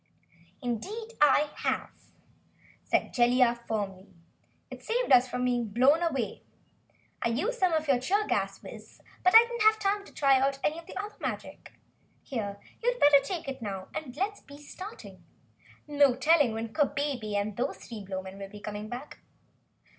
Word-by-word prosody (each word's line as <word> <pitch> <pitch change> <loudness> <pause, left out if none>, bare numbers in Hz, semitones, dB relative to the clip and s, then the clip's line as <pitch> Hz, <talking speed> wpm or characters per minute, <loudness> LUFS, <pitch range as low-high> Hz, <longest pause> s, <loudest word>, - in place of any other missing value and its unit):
"Indeed 390 - -4
I 295 0 +5
have," - - -2 0.9
said - - 0
Jellia 245 0 +4
firmly. 195 -3 -3 0.6
"It - - -9
saved 485 - -1
us 255 0 +7
from 250 0 -2
being 245 -2 0
blown 260 +10 +4
away. 275 -10 -2 0.8
I - - +1
used 400 - -1
some 370 -2 +3
of 315 -1 0
your 270 -3 +3
cheer 400 +11 +1
gas, - - -2
Wiz, - - -12 0.2
but 365 - +4
I 455 - +11
didn't 475 -1 -5
have 435 0 +5
time 405 -1 0
to - - -15
try 275 -2 +3
out 270 +1 +1
any 315 +2 0
of 335 - -14
the - - -9
other 420 +1 -5
magic. - - -6 0.5
Here, 205 -6 -4 0.2
you'd - - 0
better 290 -1 +7
take 335 +1 -5
it 265 -1 -5
now 195 -3 -5
and 295 -5 -5
do 280 - -9
let's 410 +1 -1
be 285 -1 -13
starting. 375 +8 -10 0.6
No 285 -3 +4
telling 295 -7 +3
when 225 0 -5
Kabebe 280 -7 -1
and 205 0 -1
those 250 +5 -2
three 220 -4 -9
Blowmen 190 0 -6
will 195 0 -7
be 210 - -11
coming 210 +1 -6
back." 250 +5 -8
275 Hz, 170 wpm, -29 LUFS, 230-335 Hz, 0.9 s, I